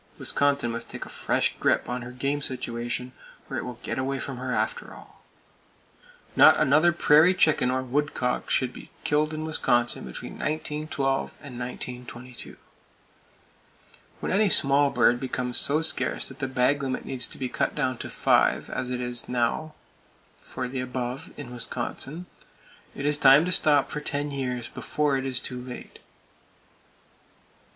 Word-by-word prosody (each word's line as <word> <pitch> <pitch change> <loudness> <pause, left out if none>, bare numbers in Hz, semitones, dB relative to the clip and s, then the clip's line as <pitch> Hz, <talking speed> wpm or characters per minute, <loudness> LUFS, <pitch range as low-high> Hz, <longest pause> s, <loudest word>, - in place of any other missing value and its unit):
Wisconsin 140 -4 +1
must 115 0 -5
take - - -6
a - - -11
fresh - - 0
grip - - +2
on 125 0 -3
her 120 - -7
game 140 +3 -2
situation, 120 -1 -3 0.4
or 130 - -4
it - - -2
will 125 -2 -6
get - - -3
away 135 +1 -1
from 135 -1 -4
her, 125 +1 -4
after 110 -1 -2
all. - - -16 1.1
Not - - +8
another 155 +5 +5
prairie 165 +2 +5
chicken 155 -7 +3
or 130 0 0
woodcock 130 -1 -1
should 130 -2 +1
be - - -11
killed 150 +1 +1
in 155 0 -4
Wisconsin 120 -6 +1
between 65 - -8
1912 150 -3 -2
and 125 -4 -8
1922. 125 0 -7 1.6
When - - -3
any 205 +2 +3
small 140 -3 +4
bird 120 -3 +3
becomes 125 -1 -2
so 150 +3 +2
scarce 160 - 0
that 135 0 -12
the 135 - -1
bag 130 +2 +2
limit 130 -2 -3
needs 130 -2 -2
to - - -10
be 130 - -2
cut - - -1
down 130 -4 -1
to - - -6
five, - - +2
as 125 - -3
it 125 -1 -3
now 125 +6 -1 0.6
is - - -23
for 130 - -5
the 130 +1 -4
above 125 0 -4
in 125 -4 -8
Wisconsin, 130 +7 -4 0.7
it 140 - -4
is 150 0 +1
time 140 +3 +7
to 180 - -1
stop 150 -5 +4
for 150 - -3
ten 145 0 -2
years, 125 -3 -3
before 150 +2 -1
it 135 0 -1
is 130 -2 -1
too 125 -1 -5
late. 125 0 -9
130 Hz, 160 wpm, -26 LUFS, 125-145 Hz, 1.6 s, Not